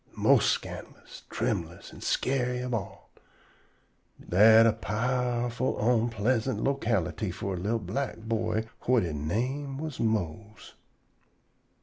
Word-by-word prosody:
mos' - - +4
scandalous, - - -5
trembulous - - -3
an' - - -12
scary 125 -1 0
ob 125 -1 -3
all. 105 -4 -5 1.2
Dat 110 +5 +7
a 115 - +4
powerful 125 +3 -1
onpleasant 115 +2 +1
locality 110 - 0
for 95 +1 -4
a - - -3
li'l 105 +6 0
black 110 +4 -3
boy 110 0 -2 0.2
whut 125 -3 +4
he 85 -3 -3
name 125 - -2
was 155 -1 -5
Mose. 110 -1 -3
115 Hz, 110 wpm, -28 LUFS, 105-125 Hz, 1.2 s, Dat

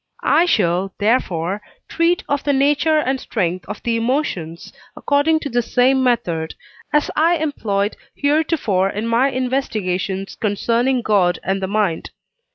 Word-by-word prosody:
I 325 +4 +4
shall, 190 - +1
therefore, 205 -4 0 0.3
treat 335 +1 +1
of 285 -1 -1
the 285 - +1
nature 290 +3 +2
and 265 -3 0
strength 180 +1 -2
of - - -7
the 235 -1 0
emotions 225 - -2 0.2
according 310 +2 +2
to 285 - -4
the 240 -1 +1
same 260 +3 +2
method, 175 -11 0 0.4
as 295 0 +1
I 330 +3 +3
employed 220 -10 -1 0.2
heretofore 285 - +1
in 210 +3 -4
my 235 +4 +2
investigations 210 -8 -2
concerning 235 +4 0
God 190 -5 +2
and 195 0 -1
the 190 - -1
mind. 200 -5 -1
235 Hz, 140 wpm, -19 LUFS, 195-285 Hz, 0.4 s, I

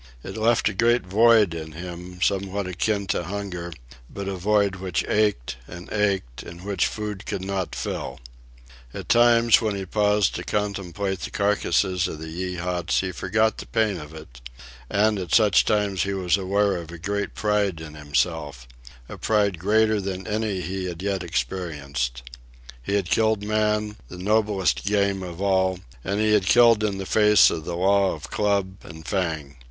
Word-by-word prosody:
It 95 - -7
left 110 +1 +2
a 105 - 0
great 115 +2 +2
void 105 0 +4
in 80 -1 -7
him, 90 +2 -7
somewhat 100 0 0
akin 100 +3 -1
to 85 - -3
hunger, 90 -2 -5 0.4
but 100 -1 -6
a 100 - -2
void 100 +1 +1
which 90 -6 -2
ached 105 - 0
and 85 +1 -9
ached, 100 - -1
and 85 +2 -11
which 100 -3 +1
food 105 -2 -5
could 95 - -3
not 95 -2 -3
fill, 65 +2 -4 0.8
At - - -7
times, 120 -1 +5
when 110 -3 -1
he 95 -1 -4
paused 105 0 +2
to - - -4
contemplate 100 -2 -2
the 75 - -5
carcasses 100 -2 +1
of - - -6
the 80 +1 -8
Yeehats, 90 -1 -1
he 95 -1 -3
forgot 110 +5 0
the - - -8
pain 110 -5 0
of 75 0 -10
it; 65 -6 -12 0.5
and 105 0 +2
at 90 -3 0
such 105 -4 +5
times 105 -3 +1
he 100 0 -1
was 90 -2 +2
aware 100 0 +1
of 85 -2 -8
a 85 - -8
great 100 +3 -3
pride 105 -5 0
in 80 -2 -9
himself,—a 70 -6 -4
pride 100 -5 +1
greater 110 +3 +2
than 95 -1 -5
any 105 -3 -2
he 95 +1 -4
had 90 0 -6
yet 100 -2 -1
experienced. 70 -5 -3 0.6
He 100 +11 -2
had 95 -4 -1
killed 110 -2 +2
man, 105 0 0
the 90 - -9
noblest 105 0 +1
game 100 -1 +1
of 90 -2 -7
all, 95 -2 +2 0.3
and 100 +2 -2
he 110 0 +3
had 100 -4 +2
killed 115 -1 +6
in 100 -2 0
the 95 - -5
face 105 +1 +5
of 80 -2 -4
the 85 - -3
law 95 +1 +3
of 75 - -11
club 100 -2 0
and 80 0 -11
fang. 80 -7 -2
95 Hz, 175 wpm, -24 LUFS, 85-105 Hz, 0.8 s, killed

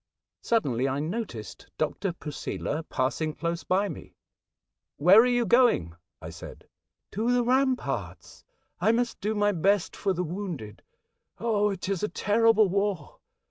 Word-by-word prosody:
Suddenly 135 - +1
I 135 +2 -2
noticed 160 - -5
Dr. 165 +5 -1
Posela 150 0 -4
passing 150 +4 -1
close 170 +2 -3
by 195 +3 +1
me. - - -9 0.4
" - - -62 0.3
Where 180 +8 +7
are 245 - +3
you 245 -1 +2
going? 215 - +3
" - - -59
I - - -7
said. - - -11 0.2
" - - -59
To 225 +4 0
the 245 0 +3
ramparts. 260 +1 -1 0.4
I 220 - +3
must 240 0 -1
do 215 +2 -1
my 205 0 +2
best 195 +1 +1
for 200 - -1
the 180 -1 -1
wounded. 170 - -6 0.6
Oh, 210 -3 +1
it 190 -2 -4
is 195 -3 -1
a 210 - 0
terrible 220 0 +3
war 195 -4 -2
200 Hz, 155 wpm, -27 LUFS, 160-225 Hz, 0.6 s, Where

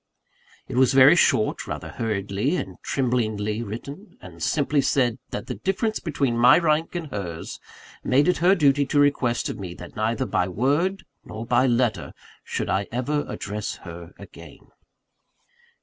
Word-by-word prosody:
It 130 - -5
was 130 0 +4
very 135 +4 +8
short 110 -10 +2
rather - - -5
hurriedly 105 - -2
and 95 - -5
tremblingly 110 -5 -1
written 140 - -8
and 85 -3 -13
simply 145 - +1
said 130 -3 +1
that - - -5
the - - -4
difference 215 +3 -1
between 140 -7 -1
my 125 +1 +7
rank 160 0 +1
and 170 -2 -3
hers 85 -6 -6 0.4
made 140 +5 +3
it 180 - +2
her 185 +3 +4
duty 145 -4 +3
to 145 - +1
request 140 -4 +2
of - - -5
me, 90 -3 -6
that 90 - -11
neither 115 +4 -1
by 90 - 0
word 145 - 0 0.2
nor 110 +1 -7
by 125 +2 +3
letter 115 - 0 0.3
should - - -3
I 100 +1 0
ever 145 +5 -1
address 105 +1 -5
her 85 0 -9
again. - - -14
125 Hz, 155 wpm, -24 LUFS, 105-145 Hz, 0.4 s, very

